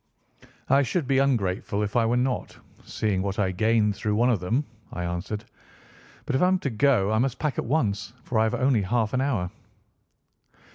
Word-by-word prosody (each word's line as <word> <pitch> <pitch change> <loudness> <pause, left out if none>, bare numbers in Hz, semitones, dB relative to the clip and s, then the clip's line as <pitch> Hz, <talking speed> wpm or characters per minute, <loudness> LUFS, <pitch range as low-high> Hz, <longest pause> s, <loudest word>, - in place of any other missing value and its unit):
"I 135 +1 +5
should 145 +4 -1
be 135 0 +2
ungrateful 105 -6 0
if 105 - -4
I 115 -2 +3
were 120 +2 +2
not, 125 0 -1 0.3
seeing 100 -4 -1
what 100 0 -3
I 95 -3 +1
gained 105 +2 +2
through 105 +1 -1
one 120 +3 +3
of 110 - +1
them," 115 +12 0 0.3
I 90 - -4
answered. 90 +5 -4 0.8
"But - - -1
if - - +1
I 180 - +5
am 185 0 +3
to 140 - -2
go, 110 -4 +2
I 110 - +2
must 135 +1 0
pack 150 -5 -2
at - - -2
once, 110 -7 0
for 115 - -1
I - - +4
have 110 - 0
only 130 -4 +2
half 110 +2 0
an 130 - +1
hour." 115 -11 -1
115 Hz, 200 wpm, -25 LUFS, 100-130 Hz, 0.8 s, I